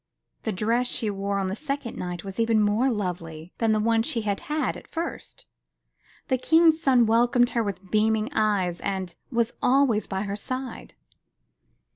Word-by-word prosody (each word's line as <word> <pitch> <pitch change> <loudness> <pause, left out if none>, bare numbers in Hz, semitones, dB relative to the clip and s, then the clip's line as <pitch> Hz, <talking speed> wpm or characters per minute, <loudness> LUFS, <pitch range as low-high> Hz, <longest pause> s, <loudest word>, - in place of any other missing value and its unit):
The 220 - -2
dress 230 +6 0
she 220 -3 0
wore 200 0 -2
on 195 - 0
the 190 - -2
second 275 -3 -4
night 175 -1 -5
was 195 +2 -7
even 225 -1 +3
more 210 +5 +2
lovely 180 -6 -4
than 225 -1 +2
the 215 - +2
one 225 +1 +2
she 230 0 0
had 205 -2 -1
had 300 +1 -2
at - - -11
first. 335 +1 -6 0.8
The 260 -1 +1
King's 320 +3 +4
son 255 -6 +4
welcomed 240 +2 +3
her 235 - +1
with 195 -3 -5
beaming 220 +4 +1
eyes 200 -5 +1
and 190 -3 -3 0.2
was. 235 -1 0
always 250 -4 +3
by 190 0 -2
her 200 -1 -3
side. 255 +5 -6
220 Hz, 170 wpm, -25 LUFS, 200-245 Hz, 0.8 s, King's